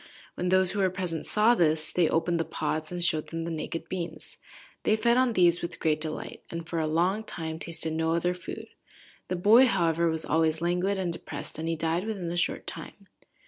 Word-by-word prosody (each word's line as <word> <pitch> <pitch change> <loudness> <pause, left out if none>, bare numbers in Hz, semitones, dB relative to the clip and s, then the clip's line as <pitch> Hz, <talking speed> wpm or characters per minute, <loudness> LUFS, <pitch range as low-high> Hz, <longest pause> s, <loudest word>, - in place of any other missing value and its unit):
When 180 - -2
those 185 0 +3
who 205 - -3
were 190 -1 +3
present 180 -4 -3
saw 215 +3 +4
this, 155 -6 +3
they 175 -3 +2
opened 170 +1 +1
the - - +2
pods, 155 0 -3
and 175 -1 -3
showed 155 -3 0
them 165 0 -4
the 170 - -4
naked 165 +1 -4
beans. 170 -4 -6 0.4
They 215 - +3
fed 235 +2 +3
on 255 -1 +3
these 175 -3 +4
with 170 - -5
great 155 -1 +1
delight, 155 -1 -5
and 165 -1 -6
for 165 - -2
a 155 - 0
long 180 +7 +1
time 160 -5 -5
tasted 165 -1 -2
no 160 0 0
other 175 +1 +1
food. 180 0 -8 0.6
The 185 - -2
boy, 220 +8 +6
however, 170 -5 +2
was 160 0 -2
always 160 0 +1
languid 180 +4 0
and 180 -3 -1
depressed, - - -5
and 160 +1 -2
he 165 - 0
died 165 +4 -1
within 190 -6 -3
a - - -3
short 175 - -1
time. - - -9
170 Hz, 215 wpm, -28 LUFS, 160-185 Hz, 0.6 s, boy